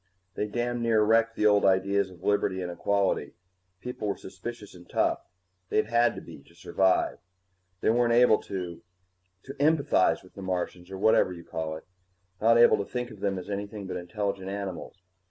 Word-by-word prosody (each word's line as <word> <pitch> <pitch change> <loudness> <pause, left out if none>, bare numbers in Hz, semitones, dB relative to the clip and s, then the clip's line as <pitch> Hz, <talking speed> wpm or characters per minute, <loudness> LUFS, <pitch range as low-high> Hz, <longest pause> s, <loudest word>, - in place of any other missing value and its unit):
They 105 - -2
damned 120 +2 -2
near 115 -2 +3
wrecked 115 +1 +3
the 105 - 0
old 105 -1 +5
ideas 95 +1 +2
of 90 -1 -16
liberty 95 -2 +1
and 90 - -4
equality. 100 +2 0 0.5
People 125 -4 -5
were 100 - -1
suspicious 105 +3 -9
and 90 -1 -15
tough - - 0 0.4
they'd 110 - +2
had 120 0 +3
to - - -7
be, - - -12
to 85 - -22
survive. 95 +2 +1 0.6
They - - +3
weren't 120 0 +2
able 120 -2 +5
to 90 -3 -6 0.6
to 135 - -8
empathize 145 -11 +2
the 100 - -10
Martians, 90 -1 -3
or 95 - -6
whatever 95 -2 +3
you 85 -2 -9
call 80 -1 -4
it. 80 - -10 0.6
Not 115 +2 +5
able 120 - +6
to 100 - -3
think 125 -1 -3
of - - -12
them 100 -1 -1
as 90 - -7
anything 100 0 -5
but 95 - -5
intelligent 95 +2 -3
animals. 95 -2 -6
100 Hz, 180 wpm, -27 LUFS, 95-115 Hz, 0.6 s, able